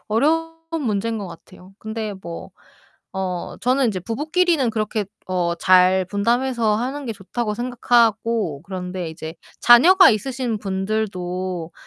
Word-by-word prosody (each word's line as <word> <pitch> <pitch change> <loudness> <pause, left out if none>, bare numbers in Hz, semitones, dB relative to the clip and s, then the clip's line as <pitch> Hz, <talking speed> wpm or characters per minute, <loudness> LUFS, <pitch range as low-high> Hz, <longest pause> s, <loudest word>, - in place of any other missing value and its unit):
어려운 325 +8 +1 0.3
문제인 220 0 -1
것 200 - -5
같아요. 180 +2 -14
근데 220 -1 -5
뭐 170 -1 -8 0.6
어 185 -2 -4
저는 255 +1 +3
인제 205 -4 -1
'부부끼리는 305 - +1
그렇게 215 -1 -2 0.2
어 175 -2 0
잘 185 +1 +4
분담해서 230 +2 +1
하는 270 +4 -4
게 230 - -2
좋다.'고 210 +2 -4
생각하고 230 - +1
그런데 180 -2 -5
이제 160 0 -8 0.3
자녀가 350 +11 +7
있으신 240 +1 -2
분들도 185 -4 -3
215 Hz, 285 characters per minute, -21 LUFS, 185-245 Hz, 0.6 s, 자녀가